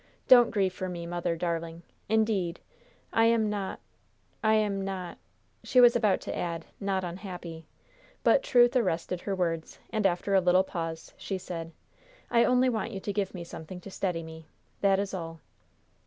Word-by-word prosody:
Don't 245 Hz, -2 st, +8 dB
grieve 195 Hz, -4 st, +1 dB
for 185 Hz, 0 st, -4 dB
me, 170 Hz, -1 st, -5 dB
mother, 175 Hz, 0 st, -2 dB
darling. 165 Hz, 0 st, -3 dB, 0.3 s
Indeed, 215 Hz, -6 st, +1 dB, 0.5 s
I 225 Hz, -, +4 dB
am 225 Hz, -2 st, +3 dB
not 200 Hz, -2 st, -3 dB, 0.6 s
I 220 Hz, 0 st, +4 dB
am 205 Hz, -2 st, +1 dB
not 185 Hz, -3 st, -5 dB, 0.2 s
" -, -, -41 dB
She 255 Hz, -, +3 dB
was 240 Hz, -1 st, +8 dB
about 215 Hz, -5 st, +2 dB
to -, -, -5 dB
add, 170 Hz, -2 st, -3 dB
"not 195 Hz, -2 st, -1 dB
unhappy," 175 Hz, -3 st, -7 dB, 0.6 s
but -, -, +5 dB
truth 245 Hz, -, +4 dB
arrested 180 Hz, -6 st, 0 dB
her 200 Hz, -, -2 dB
words, 165 Hz, -3 st, -2 dB
and 215 Hz, -3 st, +2 dB
after 185 Hz, +2 st, -1 dB
a 190 Hz, -, +5 dB
little 180 Hz, +1 st, +4 dB
pause 165 Hz, -3 st, -5 dB
she 195 Hz, -, -4 dB
said: 165 Hz, -3 st, -6 dB, 0.6 s
"I 235 Hz, 0 st, +5 dB
only 250 Hz, +1 st, +4 dB
want 230 Hz, -2 st, -1 dB
you 195 Hz, -, -4 dB
to 200 Hz, +1 st, -4 dB
give 200 Hz, -2 st, -2 dB
me 175 Hz, -, -5 dB
something 170 Hz, +1 st, -9 dB
to 200 Hz, -, -10 dB
steady 180 Hz, -4 st, -2 dB
me. 160 Hz, -1 st, -11 dB, 0.3 s
That 195 Hz, -1 st, +3 dB
is 200 Hz, 0 st, -2 dB
all." 165 Hz, -3 st, -5 dB
190 Hz, 175 wpm, -29 LUFS, 170-215 Hz, 0.6 s, Don't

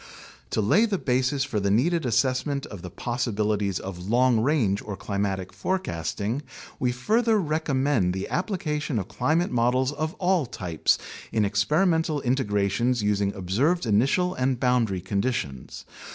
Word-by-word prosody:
To -, -, 0 dB
lay 205 Hz, -, +4 dB
the 205 Hz, -3 st, 0 dB
basis 130 Hz, 0 st, +1 dB
for 130 Hz, -7 st, -2 dB
the 100 Hz, 0 st, 0 dB
needed 155 Hz, -, +2 dB
assessment 130 Hz, +4 st, 0 dB
of 100 Hz, -4 st, -9 dB
the 90 Hz, -, -7 dB
possibilities 105 Hz, -3 st, -1 dB
of 95 Hz, 0 st, -7 dB
long 125 Hz, 0 st, +4 dB
range 110 Hz, -6 st, +1 dB
or 100 Hz, -2 st, -6 dB
climatic 100 Hz, -2 st, -3 dB
forecasting, 110 Hz, -, -2 dB, 0.4 s
we 125 Hz, -1 st, +1 dB
further 220 Hz, -, +2 dB
recommend 140 Hz, -, +1 dB
the 95 Hz, -, -3 dB
applica 175 Hz, -6 st, -1 dB
tion 145 Hz, -4 st, -2 dB
of 95 Hz, -3 st, -2 dB
climate 160 Hz, +8 st, 0 dB
models 125 Hz, +2 st, +2 dB
of 155 Hz, +3 st, -3 dB
all 180 Hz, -6 st, +1 dB
types 90 Hz, -8 st, 0 dB, 0.3 s
in 110 Hz, -2 st, +2 dB
experimental 155 Hz, -, +1 dB
integrations 120 Hz, -2 st, +1 dB
using 100 Hz, -1 st, +1 dB
observed 120 Hz, -, 0 dB
initial 135 Hz, -, +2 dB
and 130 Hz, -3 st, 0 dB
boundary 120 Hz, -7 st, +1 dB
conditions. 95 Hz, -, -3 dB
125 Hz, 140 wpm, -25 LUFS, 100-150 Hz, 0.4 s, lay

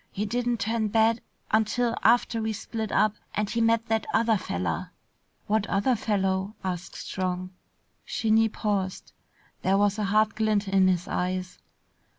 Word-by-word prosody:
He 205 Hz, +2 st, -2 dB
didn't 240 Hz, +1 st, -1 dB
turn 220 Hz, 0 st, 0 dB
bad 225 Hz, +2 st, +3 dB, 0.3 s
until 230 Hz, +2 st, +2 dB
after 230 Hz, -1 st, +3 dB
we 220 Hz, 0 st, -1 dB
split 220 Hz, 0 st, -4 dB
up 215 Hz, +1 st, +3 dB, 0.2 s
and 210 Hz, 0 st, 0 dB
he 230 Hz, +3 st, -1 dB
met 225 Hz, 0 st, +3 dB
that 225 Hz, -1 st, -1 dB
other 225 Hz, -1 st, +3 dB
feller." 90 Hz, -, -3 dB, 0.6 s
"What 215 Hz, 0 st, +1 dB
other 200 Hz, +6 st, +2 dB
fellow?" 195 Hz, -1 st, -1 dB
asked 180 Hz, -1 st, -4 dB
Strong. 185 Hz, -1 st, -3 dB, 0.6 s
Skinny 225 Hz, 0 st, +2 dB
paused. 200 Hz, -3 st, -2 dB, 0.5 s
There 195 Hz, +1 st, +2 dB
was 205 Hz, +1 st, +2 dB
a 210 Hz, -, 0 dB
hard 215 Hz, +1 st, +3 dB
glint 215 Hz, -1 st, +1 dB
in 190 Hz, -1 st, +4 dB
his 180 Hz, -2 st, +1 dB
eyes. 185 Hz, 0 st, -2 dB
215 Hz, 150 wpm, -27 LUFS, 190-225 Hz, 0.6 s, in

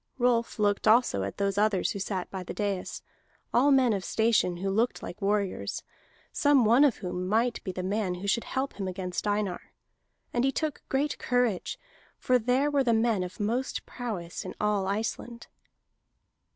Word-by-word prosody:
Rolf 240 Hz, -2 st, +1 dB
looked 205 Hz, 0 st, +1 dB
also 220 Hz, -, +4 dB
at 95 Hz, +1 st, -4 dB
those 200 Hz, 0 st, 0 dB
others 210 Hz, -3 st, +2 dB
who 200 Hz, -, -4 dB
sat 190 Hz, -2 st, -3 dB
by 190 Hz, -, -4 dB
the 180 Hz, -, -7 dB
dais, 200 Hz, -3 st, -3 dB, 0.5 s
all 260 Hz, +4 st, +5 dB
men 260 Hz, -4 st, +4 dB
of 195 Hz, -2 st, -2 dB
station 220 Hz, -6 st, +2 dB
who 195 Hz, +2 st, -2 dB
looked 225 Hz, +5 st, 0 dB
like 205 Hz, -, -8 dB
warriors, 200 Hz, -1 st, -1 dB, 0.5 s
some 285 Hz, -5 st, +4 dB
one 235 Hz, +6 st, +6 dB
of 280 Hz, -6 st, +3 dB
whom 180 Hz, 0 st, -4 dB
might 230 Hz, +4 st, +1 dB
be 190 Hz, -, -3 dB
the 185 Hz, 0 st, -5 dB
man 195 Hz, -1 st, -1 dB
who 180 Hz, +3 st, -7 dB
should 215 Hz, +4 st, +1 dB
help 265 Hz, -3 st, -3 dB
him 195 Hz, -, -2 dB
against 185 Hz, +1 st, -3 dB
Einar. 205 Hz, -3 st, -2 dB, 0.6 s
And 240 Hz, -, +1 dB
he 270 Hz, -, +3 dB
took 305 Hz, +1 st, -2 dB
great 280 Hz, +2 st, 0 dB
courage, 245 Hz, -7 st, 0 dB, 0.4 s
for 255 Hz, -1 st, +2 dB
there 255 Hz, +5 st, +1 dB
were 280 Hz, -2 st, +3 dB
the 235 Hz, -3 st, +3 dB
men 225 Hz, -3 st, +2 dB
of 180 Hz, 0 st, -6 dB
most 235 Hz, +5 st, -1 dB
prowess 205 Hz, -9 st, -5 dB
in -, -, -7 dB
all 210 Hz, -2 st, +1 dB
Iceland. 225 Hz, +3 st, -3 dB
215 Hz, 180 wpm, -28 LUFS, 195-245 Hz, 0.6 s, one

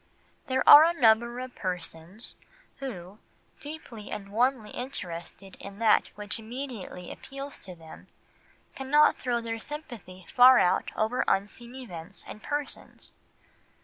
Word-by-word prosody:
There 260 Hz, -1 st, 0 dB
are 295 Hz, -, +12 dB
a 335 Hz, 0 st, +1 dB
number 235 Hz, 0 st, +4 dB
of 255 Hz, 0 st, -6 dB
persons 180 Hz, +2 st, -6 dB, 0.4 s
who, 205 Hz, -7 st, -8 dB, 0.4 s
deeply 285 Hz, -8 st, -9 dB
and 200 Hz, -1 st, -6 dB
warmly 235 Hz, +1 st, 0 dB
interested 195 Hz, -6 st, -7 dB
in 200 Hz, 0 st, -10 dB
that 220 Hz, -1 st, +4 dB
which 210 Hz, +1 st, -6 dB
immediately 225 Hz, -6 st, -7 dB
appeals 275 Hz, +1 st, -9 dB
to 185 Hz, -, -10 dB
them, 160 Hz, -1 st, -14 dB, 0.7 s
cannot 295 Hz, +3 st, +4 dB
throw 240 Hz, -2 st, -1 dB
their 225 Hz, 0 st, -4 dB
sympathy 225 Hz, -, -9 dB
far 255 Hz, +1 st, +9 dB
out 180 Hz, -, +2 dB
over 220 Hz, +4 st, 0 dB
unseen 235 Hz, +5 st, -2 dB
events 195 Hz, -7 st, -9 dB
and 215 Hz, -, -9 dB
persons. 290 Hz, +2 st, -6 dB
230 Hz, 125 wpm, -28 LUFS, 195-260 Hz, 0.7 s, are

